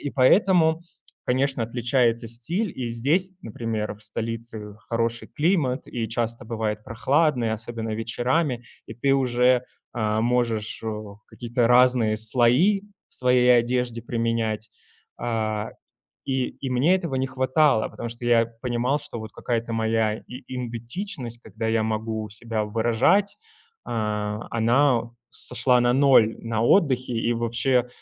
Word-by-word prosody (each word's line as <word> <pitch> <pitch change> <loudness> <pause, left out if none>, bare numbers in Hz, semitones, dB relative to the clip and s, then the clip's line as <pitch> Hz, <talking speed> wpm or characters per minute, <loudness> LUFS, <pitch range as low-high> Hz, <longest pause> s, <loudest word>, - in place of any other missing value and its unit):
и 145 - -3
поэтому, 160 +3 +4 0.4
конечно, 130 -1 +1
отличается 120 0 +1
стиль, 165 - -2
и 125 - -3
здесь, 150 +12 +1
например, 110 -1 -3
в 105 - -20
столице 110 -1 -5
хороший 115 0 -1
климат 145 -6 +1
и 115 -2 -3
часто 115 +1 -3
бывает 110 -2 -3
прохладный, 130 0 +1
особенно 110 0 -4
вечерами, 120 +4 -1 0.2
и - - -8
ты 135 +3 +2
уже, 125 -1 +3 0.3
а 110 -2 0
можешь 115 -3 0
в 110 - -3
о 105 -1 -7
какие-то 120 0 -1
разные 125 -3 +4
слои 125 - +3 0.3
в - - -17
своей 125 -1 +4
одежде 120 -1 0
применять. 115 -2 -2 0.5
А 110 -2 -2 0.6
и 130 -1 0
и 135 - -7
мне 135 +9 +3
этого 165 -8 -3
не 130 0 0
хватало, 130 -2 +2
потому 120 - -6
что 120 +1 -9
я 115 -1 +4 0.2
понимал, 125 +3 0
что 140 -5 -7
вот 110 0 -8
какая-то 115 -1 -2
моя 110 -1 +1
и 125 +1 -9
идентичность, 120 - -6
когда 115 - -5
я 110 -1 +2
могу 110 0 -2
себя 110 0 -3
выражать. 120 - +2 0.5
А 105 -1 -2
она, 120 +3 +3
у 120 0 -13 0.2
сошла 125 -2 +1
на 120 0 +3
ноль 130 -5 +5
на 115 -1 -2
отдыхе, 130 -5 +3
и 115 +1 0
вообще 120 +2 +1
120 Hz, 135 wpm, -24 LUFS, 115-130 Hz, 0.6 s, ноль